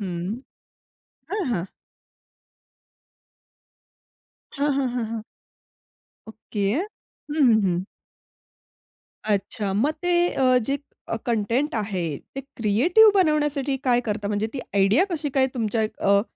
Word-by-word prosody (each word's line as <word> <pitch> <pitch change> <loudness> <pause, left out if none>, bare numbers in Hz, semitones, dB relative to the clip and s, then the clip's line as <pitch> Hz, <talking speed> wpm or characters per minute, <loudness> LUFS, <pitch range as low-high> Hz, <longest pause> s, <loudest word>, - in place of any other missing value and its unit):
हं. 185 +4 -4 0.9
हां, 405 -2 -1
हां. 185 -5 -2 2.9
हां, 290 +1 0
हां, 270 -1 +1
हां, 240 -2 -2
हां. 220 -1 -5 1.0
ओके. 210 -2 -4
हं, 360 -6 -9
हं, 220 -2 +5
हं. 180 +1 0 1.4
अच्छा, 205 -1 -1
मग 260 +10 +2
ते 350 0 +3
अ, 255 -1 +4
जे 275 +4 -1 0.5
कंटेंट 235 +5 0
आहे, 185 -9 -2 0.2
ते 270 - -3
क्रिएटिव्ह 275 - +4
बनवण्यासाठी 295 -5 +2
काय 245 -2 +3
करता? 210 -1 -2
म्हणजे 210 +1 -1
ती 270 - -4
आयडिया 200 - +4
कशी 310 -4 -2
काय 265 -1 +2
तुमच्या 225 -2 -1
अ, 200 -2 +2
235 Hz, 110 wpm, -24 LUFS, 205-285 Hz, 2.9 s, हं